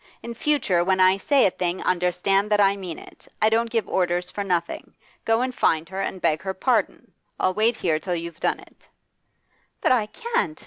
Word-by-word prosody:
In 235 - -6
future, 230 -10 +1
when 190 +1 +1
I 185 +1 +5
say 275 +7 +3
a 190 - +3
thing 175 0 -2
understand 185 +3 +1
that 210 -1 +2
I 200 -1 +4
mean 185 -5 -7
it; - - -14
I 215 - +4
don't 230 +1 +1
give 225 -2 -1
orders 180 0 -1
for 205 - -4
nothing. 175 -3 -3 0.3
Go 225 +1 +2
and 255 0 -2
find 160 -8 +1
her 190 +1 -4
and 190 - -4
beg 155 -3 +1
her 190 -1 -4
pardon. 225 -1 -1 0.3
I'll 185 - +1
wait 220 +4 +2
here 165 -7 0
till 175 +2 -3
you've 170 -1 -6
done - - 0
it.' - - -19 0.9
'But - - +1
I 230 -5 +2
can't! 215 - -2
190 Hz, 200 wpm, -23 LUFS, 180-225 Hz, 0.9 s, I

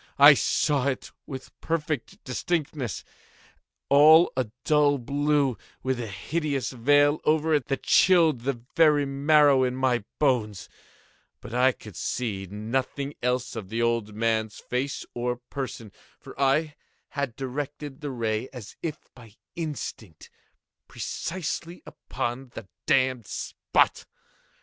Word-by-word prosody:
I 145 +1 +10
saw 140 0 +1
it 130 -2 -3 0.2
with 130 -2 -8
perfect 155 -5 -3
distinctness—all 150 - +1
a 130 -4 -1
dull 145 -2 +3
blue, 140 -2 0 0.2
with 130 -1 -1
a 115 - -4
hideous 140 - -2
veil 145 +4 +3
over 155 +1 +2
it 145 -5 +1
that 135 - -2
chilled 165 -7 +5
the 130 -1 -2 0.2
very 150 -3 +5
marrow 140 0 +4
in 125 0 0
my 130 -3 +1
bones; 115 -9 0 0.7
but 115 - -10
I 125 +2 +4
could 105 -6 -13
see 100 -6 -3
nothing 130 +7 -3
else 125 0 -1
of 105 -5 -6
the 115 +2 -1
old 115 -3 0
man's 110 -1 0
face 130 +3 -3
or 120 0 -1
person: 125 -3 -7 0.3
for - - -11
I 150 +3 +2 0.4
had 140 -5 -3
directed 140 +1 -5
the 145 - -4
ray 115 -1 -2
as 125 -6 -10
if 160 -2 -3 0.2
by 115 -4 -16 0.2
instinct, 140 - -6 0.6
precisely 170 0 -5
upon 125 +2 -5
the 115 - -8 0.2
damned 130 -5 +2
spot. - - 0
130 Hz, 125 wpm, -26 LUFS, 120-145 Hz, 0.7 s, I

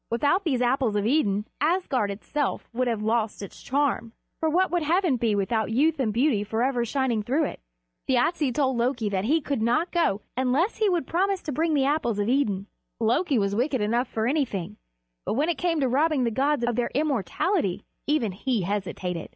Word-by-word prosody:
Without 290 - +1
these 270 -8 0
Apples 245 -3 +1
of 205 0 0
Idun, 210 -6 +1 0.2
Asgard 300 - +1
itself 260 +8 -3
would 250 +2 0
have 225 -3 -1
lost 220 -1 0
its 200 - -10
charm; 270 -4 -1 0.3
for 320 - +1
what 365 +4 +2
would 350 -1 +1
heaven 335 -1 +2
be 230 -3 +1
without 220 +2 0
youth 290 +7 +2
and 235 -5 +1
beauty 235 -2 +2
forever 240 +4 0
shining 240 -2 0
through 270 +9 0
it? - - -4 0.5
Thjasse 265 +3 +2
told 265 -1 0
Loki 235 -2 0
that 195 0 -1
he 310 +7 +3
could 275 -4 -2
not 245 +10 +1
go 325 - +1
unless 260 - +1
he 430 -2 +2
would 345 -6 0
promise 385 +4 0
to 300 - -4
bring 315 +3 +1
the 270 -2 +2
Apples 275 -7 0
of 205 0 0
Idun. 215 -8 +1 0.3
Loki 245 +6 +2
was 200 -2 +1
wicked 260 +3 0
enough 235 +4 0
for 220 -2 -2
anything; 220 - -1 0.5
but - - -2
when 295 +6 +1
it 335 - 0
came 340 -3 +1
to 265 - +2
robbing 285 +2 +2
the 235 - +1
gods 275 +2 +1
of 240 -1 0
their 245 0 0
immortality, 285 - 0 0.2
even 280 -8 +1
he 225 +2 -1
hesitated. 185 -3 -3
255 Hz, 195 wpm, -26 LUFS, 220-300 Hz, 0.5 s, he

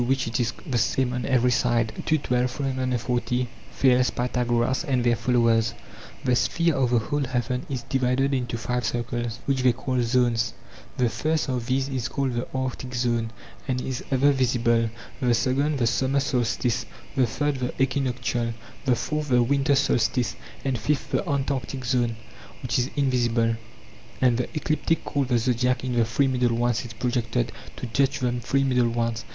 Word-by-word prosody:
which 130 +2 +1
it 115 +2 -2
is 120 -1 +1
the 125 -4 0
same 130 +3 +1
on 125 0 -2
every 125 -2 +3
side. 120 -2 +1 0.2
ii. 155 - +5
12; 125 -3 0
340. 125 -2 -1 0.2
Thales, 125 -2 +3
Pythagoras, 120 +1 0
and 130 -6 0
their 120 -1 +3
followers: 115 -2 +2 0.5
The 125 - +3
sphere 170 +6 +2
of 130 -3 +1
the 120 - +3
whole 145 +5 0
heaven 125 0 -2
is 130 -3 -3
divided 135 +1 +1
into 125 -3 -1
five 125 +2 -2
circles, 120 -1 -2
which 135 -2 +1
they 125 -1 +4
call 130 0 -1
zones; 115 -2 +1 0.4
the 125 -2 +3
first 155 +5 -1
of 125 -2 -2
these 130 +1 +1
is 130 -4 -2
called 135 -3 -1
the 120 +1 -2
arctic 130 -1 -3
zone 120 -2 0 0.4
and 130 -2 0
is 130 0 -4
ever 140 +2 +4
visible; 120 -3 +2 0.3
the 125 -3 +3
second 135 +6 +1
the 120 - +1
summer 130 +4 +2
solstice, 125 -3 0 0.3
the 130 -2 +3
third 145 +5 -1
the 125 -1 -2
equinoctial, 125 -3 0 0.3
the 130 -2 +4
fourth 150 +4 -2
the 125 -1 +4
winter 140 +2 +2
solstice, 125 -3 +1 0.3
and 130 -3 0
fifth 145 +6 -1
the - - 0
antarctic 135 -2 -2
zone, 120 -2 +1 0.5
which 125 0 0
is 125 +2 0
invisible. 120 -4 +2 0.6
And 125 -2 +3
the 125 - -1
ecliptic 155 +1 0
called 140 -2 0
the 125 -2 +2
zodiac 125 +2 +1
in 130 -1 -2
the 120 -1 +3
three 135 +5 +1
middle 125 -2 +1
ones 120 -1 +1
is 115 - -8
projected 120 0 -1 0.2
to - - -5
touch 135 +4 +1
the 125 -2 0
three 135 +3 +1
middle 125 -3 +2
ones. 115 -1 -1
125 Hz, 175 wpm, -25 LUFS, 120-135 Hz, 0.6 s, ii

